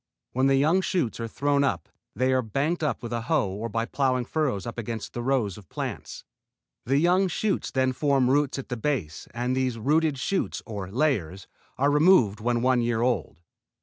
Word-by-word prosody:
When 130 +2 +2
the 135 - +4
young 155 +7 +3
shoots 175 -13 -1
are 115 - -3
thrown 140 +4 +1
up 95 - -1 0.3
they 130 +1 +2
are 130 - +3
banked 140 +10 -1
up 150 -5 -1
with 120 0 -5
a 115 - -1
hoe 130 -3 +1
or 105 +4 -4
by 115 +1 -1
plowing 130 -1 0
furrows 135 -9 -1
up 120 0 -5
against 115 -1 -5
the 120 - -4
rows 120 -7 0
of 95 -7 -18
plants. - - -6 0.6
The 135 +2 +3
young 180 +5 +3
shoots 195 +3 -1
then 130 -1 +1
form 140 -2 +2
roots 140 +1 +2
at 135 - -7
the 125 - -3
base 110 - -3
and 125 +2 -2
these 130 -2 0
rooted 150 +5 +1
shoots 190 +8 -2
or 100 -5 -6
layers 100 - -1 0.3
are 140 +2 +2
removed 150 - +4
when 120 +1 0
one 130 -1 +3
year 120 -1 0
old. 115 - -1
130 Hz, 195 wpm, -26 LUFS, 115-145 Hz, 0.6 s, the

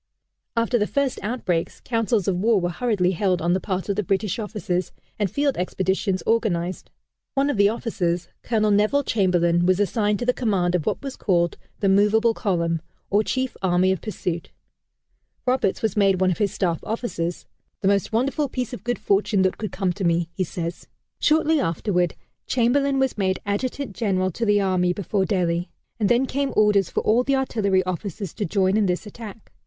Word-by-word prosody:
After 230 +1 +2
the 210 - +1
first 280 -2 0
outbreaks, 195 -7 -2
councils 225 -4 0
of 195 - +2
war 210 +3 +3
were 175 -1 -1
hurriedly 185 -2 +1
held 185 0 +1
on 170 +2 +1
the 185 - +1
part 185 -1 -3
of 200 - 0
the 210 - +1
British 195 +2 -1
officers, 210 -4 -2 0.3
and 205 -2 +1
field 285 +5 0
expeditions 190 +1 -1
organized. 185 -6 0 0.5
One 280 +1 +2
of 260 - -3
the 200 0 +5
officers, 180 -6 -2
Colonel 215 -2 +1
Neville 215 +8 +3
Chamberlain, 175 -6 +2
was 185 +1 +3
assigned 205 0 +1
to 240 - -3
the 250 - +3
command 195 -8 0
of 175 -4 -1
what - - -1
was 275 -1 -5
called 170 -3 +1 0.3
the 200 - +2
"Movable 210 +4 +4
Column," 170 -7 -1 0.3
or 205 +2 +4
chief 260 +2 -2
army 185 0 +3
of 190 - -2
pursuit. 175 -5 -4 1.0
Roberts 250 -6 +1
was 220 -4 0
made 195 -3 +3
one 185 -1 +3
of 175 - -3
his 205 -2 +1
staff 170 -4 -1
officers 210 -7 -3 0.4
"the 195 - +1
most 200 -1 +2
wonderful 275 +5 0
piece 250 -2 -3
of 200 - -7
good 245 +1 -1
fortune 200 -1 +2
that 185 - 0
could 215 - -4
come 185 -2 -1
to 195 - -5
me," 170 -1 +1
he 185 - -1
says. 170 0 -5 0.3
Shortly 315 0 +3
afterward, 180 - 0 0.3
Chamberlain 270 +3 +2
was 265 -4 0
made 190 -1 +1
Adjutant 225 +2 -2
General 190 -4 0
to 230 +6 -2
the 205 0 +4
Army 180 -2 +1
before 195 +1 -1
Delhi, 175 -3 0 0.3
and 210 - +2
then 245 +2 +3
came 275 +1 -2
orders 205 -4 +4
for - - -1
all 225 +3 +3
the 275 +1 +1
artillery 200 -8 +1
officers 185 0 -4
to 210 - -3
join 190 +2 +2
in 210 -2 +2
this 180 +3 -1
attack. 215 0 -10
200 Hz, 190 wpm, -23 LUFS, 180-230 Hz, 1.0 s, the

